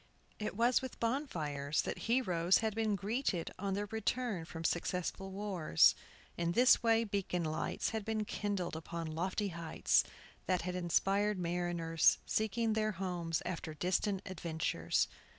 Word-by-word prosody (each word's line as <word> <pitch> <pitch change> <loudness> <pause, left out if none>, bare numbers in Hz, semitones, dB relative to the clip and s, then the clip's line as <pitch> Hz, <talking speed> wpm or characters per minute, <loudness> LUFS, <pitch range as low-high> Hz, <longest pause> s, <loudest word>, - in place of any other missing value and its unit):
It 210 -2 -4
was 240 +2 +4
with 260 - -7
bonfires 155 - -1
that - - -4
heroes 185 -8 +3
had 220 -1 -1
been 220 -1 +1
greeted 200 -3 -1
on 195 0 -1
their 205 +1 -1
return 220 -3 -2
from 165 +1 -7
successful 180 +3 -1
wars. 190 - +3 0.4
In 170 0 0
this 245 +4 +6
way 230 -1 +4
beacon 195 -4 -1
lights 155 0 -1
had 220 -1 -2
been 220 0 -1
kindled 200 -5 -2
upon 165 +1 -5
lofty 185 +5 -1
heights, 170 -2 +2 0.4
that 180 -2 +1
had 180 +1 -3
inspired 195 +4 +1
mariners 170 -2 +2
seeking 220 +1 0
their 215 0 0
homes 175 -3 -2
after 160 -3 -4
distant 185 +4 0
adventures. 165 -3 -1
190 Hz, 140 wpm, -34 LUFS, 170-215 Hz, 0.4 s, this